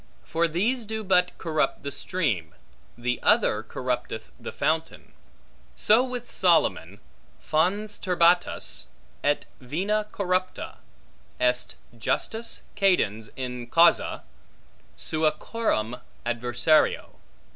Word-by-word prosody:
For 170 +1 +1
these 220 +10 0
do 220 0 -4
but 180 -2 +2
corrupt 155 -4 -1
the 140 - -4
stream, 120 - -2 0.4
the 125 +1 -1
other - - +3
corrupteth 60 - -4
the - - -6
fountain. - - -2 0.6
So 225 +4 +4
with 250 -2 -5
Solomon, 170 -4 +2 0.4
Fons 190 - 0
turbatus, 175 -1 +2 0.4
et 145 0 +1
vena 195 +11 -1
corrupta, 185 -1 -2 0.6
est 125 0 +1 0.2
justus 225 - -1
cadens 115 - +2
in 125 -2 -5
causa 165 - +4 0.7
sua 155 0 +1
coram 140 - -2 0.3
adversario. 120 +5 +1
170 Hz, 95 wpm, -26 LUFS, 125-200 Hz, 0.7 s, So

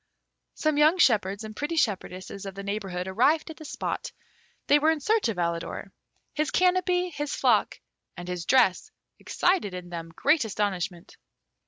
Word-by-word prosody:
Some 310 -1 0
young 310 +4 +5
shepherds 210 - +2
and 215 0 -8
pretty 295 +6 -3
shepherdesses 195 - -2
of 195 - -7
the 200 - -6
neighbourhood 195 -3 -4
arrived 285 - +2
at 315 - -12
the 310 - -11
spot. 300 - -4 0.5
They 290 - +5
were 310 +2 +3
in 320 -1 +1
search 430 - +1
of 220 - -3
Alidor. 170 -1 -3 0.4
His 305 0 0
canopy, 360 0 +2
his 295 -1 -3
flock, - - +2 0.4
and 175 0 -7
his 180 -2 -4
dress 250 -8 +3 0.3
excited 350 - 0
in 180 -1 -8
them 165 -1 -6
great 295 -1 +3
astonishment. 190 -5 -3
220 Hz, 160 wpm, -26 LUFS, 185-310 Hz, 0.5 s, young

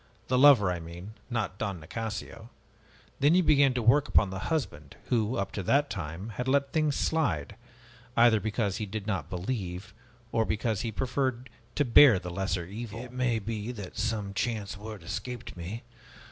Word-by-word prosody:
The 125 - +3
lover, 130 -9 +7
I 90 - -2
mean, 85 +5 -9 0.2
not 105 -6 -2
Don 100 -5 -2
Nicasio. 110 +5 -6 0.7
And 150 +5 +5
you 185 - +4
began 140 -4 +4
to 120 - 0
work 140 +6 +4
upon 100 -3 +3
the 95 - -4
husband, 75 - -3
who, 115 0 +1
up 100 0 -2
to 100 - -4
that 140 +10 +2
time, 85 +6 -5
had 125 +4 -4
let 140 +1 +1
things 155 -3 +2
slide, 105 - 0 0.6
either 115 -2 +6
because 105 -2 -1
he 105 - -4
did 105 0 -5
not 95 -9 -2
believe, 95 -1 -4 0.4
or 115 - +2
else 110 - -1
because 110 -1 0
he 115 - -2
preferred 130 0 -2 0.2
to 145 - +2
bear 125 -2 +8
the 90 -1 -6
lesser 90 -1 -2
evil 110 +4 -7
" - - -6
"It 125 - -10
may 125 -2 +1
be 110 +1 -4
that 100 -6 -8
some 105 -1 -2
chance 105 -1 -2
word 105 -2 -8
escaped 125 +7 -6
me. 95 +7 -6
110 Hz, 185 wpm, -29 LUFS, 95-125 Hz, 0.7 s, bear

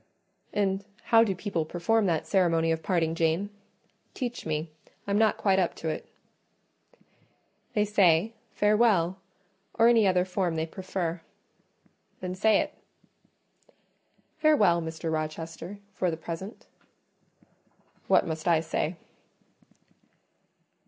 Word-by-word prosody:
"And 195 -1 0 0.2
how 225 -1 +5
do 200 -4 -1
people 185 -3 -2
perform 195 +7 +1
that 165 -3 0
ceremony 165 -4 +2
of 160 0 -1
parting, 165 -3 0
Jane? 165 +5 0 0.6
Teach 245 - -4
me; 155 +1 -2 0.3
I'm 200 +1 +1
not 220 -1 +3
quite 190 -2 +2
up 180 - 0
to 160 - -4
it." 155 - -5 1.6
"They 210 -1 +2
say, 200 0 +3 0.2
Farewell, 210 -4 +3 0.6
or 230 0 +5
any 225 -4 +5
other 180 -1 +2
form 180 -2 -1
they 160 0 -1
prefer." 175 -1 -4 1.0
"Then 180 0 -4
say 210 +2 +3
it." - - -5 1.7
"Farewell, 210 - +4
Mr. 160 0 -4
Rochester, 160 +4 -5 0.2
for 185 -1 0
the 160 - -3
present." 170 +6 -7 1.4
"What - - +4
must 160 0 -4
I 170 -2 +4
say?" 160 +1 -2
180 Hz, 115 wpm, -28 LUFS, 165-205 Hz, 1.7 s, how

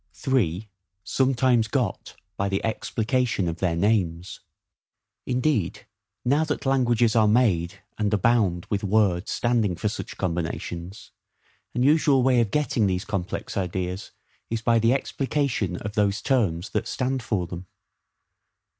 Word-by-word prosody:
3. 110 - 0 0.4
Sometimes 130 -3 +2
got - - -2 0.2
by 100 0 -1
the 95 0 0
Explication 110 -3 0
of 85 0 -3
their 90 -3 0
Names. 90 -3 0 0.9
Indeed, 125 - 0 0.4
now 145 +5 +3
that 150 -2 -3
languages 120 -4 +2
are 110 -2 +5
made, 100 -5 +1 0.2
and 105 -2 +1
abound 105 -4 +2
with 100 -1 0
words 100 -3 +2
standing 115 -6 +1
for 105 +5 -1
such - - -7
combinations, 85 +1 -4 0.6
an 125 - +1
usual 145 -2 +4
way 125 -2 +4
of 115 - 0
GETTING 120 -4 +1
these 90 0 -1
complex 100 -3 -4
ideas 95 0 -3 0.4
is, 115 -1 -3
by 115 -1 +3
the 115 +1 +3
explication 135 - -1
of 105 +2 -6
those 100 0 +1
terms 100 - +1
that - - -1
stand 130 0 -1
for 105 -5 -1
them. 90 +1 -8
105 Hz, 135 wpm, -25 LUFS, 95-125 Hz, 0.9 s, are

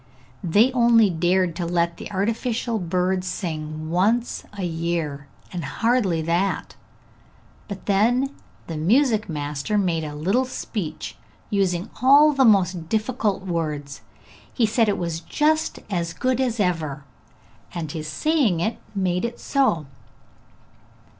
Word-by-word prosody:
They 205 +9 +4
only 235 -5 +5
dared 175 +1 +1
to 175 - -2
let 170 0 0
the - - -8
artificial 225 +3 -1
bird 180 +1 0
sing 155 -4 -4
once 220 +7 +1
a 195 - -3
year, 165 -4 -2 0.3
and 175 -2 -3
hardly 195 - +1
that; 175 +4 -1 0.9
but 200 -2 -7
then 240 +7 +2 0.3
the 165 - -5
music 220 - +2
master 150 +5 -2
made 175 -5 +1
a 150 -1 -5
little 195 +13 +1
speech, 210 -8 -5 0.3
using 190 -3 0
all 285 +4 +7
the 270 -2 +4
most 185 -6 +3
difficult 215 -2 0
words. 150 -5 -3 0.5
He 240 - +2
said 220 0 +2
it 205 - 0
was 170 -2 -3
just 310 - +1
as 170 -5 -2
good 255 +7 0
as 240 -3 -1
ever, 160 -7 -1 0.7
and 160 -4 -4
his 155 -1 -5
saying 250 - +1
it 220 +6 -1 0.2
made 180 -2 0
it 235 0 -3
so. 260 - +1
185 Hz, 130 wpm, -23 LUFS, 165-230 Hz, 0.9 s, all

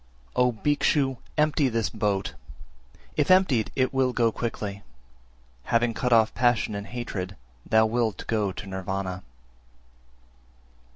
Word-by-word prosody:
369. 125 - +3
O 120 -3 -1
Bhikshu, 145 -2 +2 0.2
empty 150 -2 +3
this 115 -3 0
boat! 105 -3 -1 0.8
if 150 - +2
emptied, 185 - +4
it 130 +1 +1
will 130 -1 +2
go 115 -2 +2
quickly; 105 -4 -4 0.8
having 115 0 +2
cut 125 +2 -1
off 110 -2 +5
passion 120 -3 +2
and 100 0 -5
hatred 100 -6 -5 0.3
thou 110 0 +5
wilt 110 -3 -1
go 105 -3 0
to 105 - -8
Nirvana. 95 -1 -4
115 Hz, 125 wpm, -26 LUFS, 100-125 Hz, 0.8 s, off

